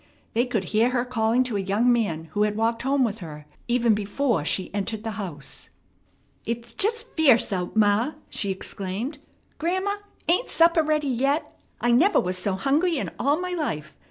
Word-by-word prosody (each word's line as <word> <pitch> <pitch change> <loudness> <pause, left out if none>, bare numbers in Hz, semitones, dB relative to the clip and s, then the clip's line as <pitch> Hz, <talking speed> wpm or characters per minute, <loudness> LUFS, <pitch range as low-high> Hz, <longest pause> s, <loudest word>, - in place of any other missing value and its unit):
They 240 +3 +1
could 220 -5 -1
hear 225 +3 +4
her 250 -1 0
calling 235 0 +2
to 240 -5 -2
a - - 0
young 210 +6 +2
man 205 -9 0
who 205 - -1
had 210 0 +2
walked 230 +1 0
home 270 +1 +2
with 225 -2 -1
her, 150 -4 -9 0.2
even 240 -2 +3
before 210 - 0
she 185 +5 -2
entered 210 +2 -3
the 225 - -3
house. 150 -8 -8 0.7
"It's 235 0 -4
just 460 +3 -1
fierce 265 -10 +4
out, 180 +1 -3
ma!" 220 +6 +3
she 200 - -2
exclaimed. 195 - -4 0.4
"Grandma, 375 +5 0 0.3
ain't 360 +9 +2
supper 335 0 +5
ready 305 -1 0
yet? 275 +4 0 0.2
I 240 - +2
never 335 +13 +5
was 180 0 -1
so 185 +2 -1
hungry 295 - +1
in - - -3
all 285 +5 +2
my 365 0 -3
life. 225 - -3
235 Hz, 180 wpm, -25 LUFS, 205-285 Hz, 0.7 s, supper